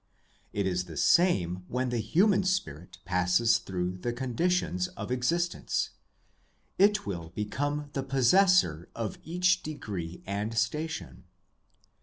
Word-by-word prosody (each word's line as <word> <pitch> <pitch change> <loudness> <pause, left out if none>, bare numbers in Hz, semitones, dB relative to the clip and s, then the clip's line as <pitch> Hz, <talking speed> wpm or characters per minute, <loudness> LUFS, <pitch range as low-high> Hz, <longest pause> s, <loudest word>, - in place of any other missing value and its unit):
It 100 -1 -1
is 90 -1 -1
the 80 -4 -9
same 90 - +3
when 125 +1 -1
the 120 -1 -1
human 185 - +3
spirit 90 - -2
passes 90 +5 +3
through 90 -1 -3
the 120 - -2
conditions 175 +9 0
of - - -5
existence: 170 +8 0 0.9
it 210 +2 +4
will 85 -5 -5
become 145 +7 -2
the 135 - -1
possessor 135 - +3
of 115 -3 -4
each 180 +2 +2
degree 95 - -6
and 105 +3 -3
station. 150 +9 -2
120 Hz, 120 wpm, -29 LUFS, -, 0.9 s, it